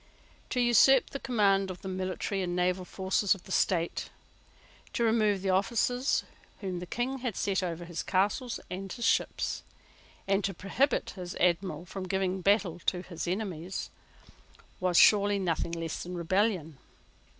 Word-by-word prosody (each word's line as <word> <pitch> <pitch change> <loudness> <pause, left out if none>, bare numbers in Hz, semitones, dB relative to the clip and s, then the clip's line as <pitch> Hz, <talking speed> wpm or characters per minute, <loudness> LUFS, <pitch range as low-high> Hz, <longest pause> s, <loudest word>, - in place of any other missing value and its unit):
To 250 - -1
usurp 245 +2 +5
the 275 - -4
command 200 -6 +2
of 185 - -8
the - - -5
military 185 +1 -2
and 175 -1 -2
naval 180 +1 0
forces 190 +2 +1
of 185 - -14
the - - -12
state, 175 -3 0 0.8
to 235 - 0
remove 215 -4 +2
the 190 - +1
officers 235 +7 +1 0.4
whom 185 -3 -4
the 180 - -7
King 255 +7 -2
had 245 -6 -3
set 195 -2 0
over 175 -1 -4
his 170 -2 -4
castles 205 +6 0
and 190 +1 -6
his 235 - -3
ships, - - +1 0.7
and 195 +1 +2
to 195 -1 -2
prohibit 255 +9 0
his 180 -2 -7
Admiral 180 0 0
from 185 +1 -6
giving 190 0 -1
battle 195 -3 +2
to 180 -1 +1
his 170 -2 -6
enemies, 185 -2 -3 0.9
was 180 -2 +1
surely 205 -1 +6
nothing 170 -3 -1
less 165 -1 -4
than 180 +1 -6
rebellion. 175 -4 0
190 Hz, 155 wpm, -30 LUFS, 180-205 Hz, 0.9 s, surely